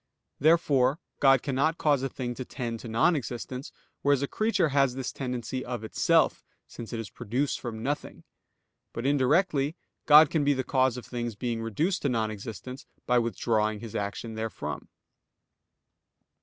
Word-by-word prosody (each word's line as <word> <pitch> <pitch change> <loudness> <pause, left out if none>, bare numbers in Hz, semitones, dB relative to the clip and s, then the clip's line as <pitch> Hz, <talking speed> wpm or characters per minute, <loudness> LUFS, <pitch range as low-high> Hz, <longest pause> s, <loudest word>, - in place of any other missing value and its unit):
Therefore 145 -4 +3 0.2
God 135 -2 +5
cannot 140 +4 +1
cause 145 -3 +2
a 135 - -1
thing 125 -2 -4
to 130 - -6
tend 120 -3 -5
to 120 - -8
non 115 +10 +3
existence, 130 0 -5 0.3
whereas 140 -1 +2
a - - 0
creature 215 -5 +1
has 135 -2 +2
this 130 -1 -3
tendency 125 -1 -4
of 120 -3 -5
itself, 110 - +2 0.2
since 115 - -9
it 115 - -3
is 110 -4 -6
produced 130 +7 -2
from 115 -3 -6
nothing. 145 +3 -4 0.7
But 115 - -5
indirectly 145 +2 +2 0.3
God 150 0 +8
can 155 -3 +1
be 145 0 +3
the 130 -1 -2
cause 130 -1 +1
of 125 - -7
things 120 -2 -4
being 115 +1 -3
reduced 150 - -1
to 140 - +1
non 110 -3 0
existence, 110 +5 -8 0.2
by 125 0 +3
withdrawing 110 -1 0
His 115 -1 -8
action 105 +3 -3
therefrom. 110 0 -5
125 Hz, 160 wpm, -28 LUFS, 115-140 Hz, 0.7 s, God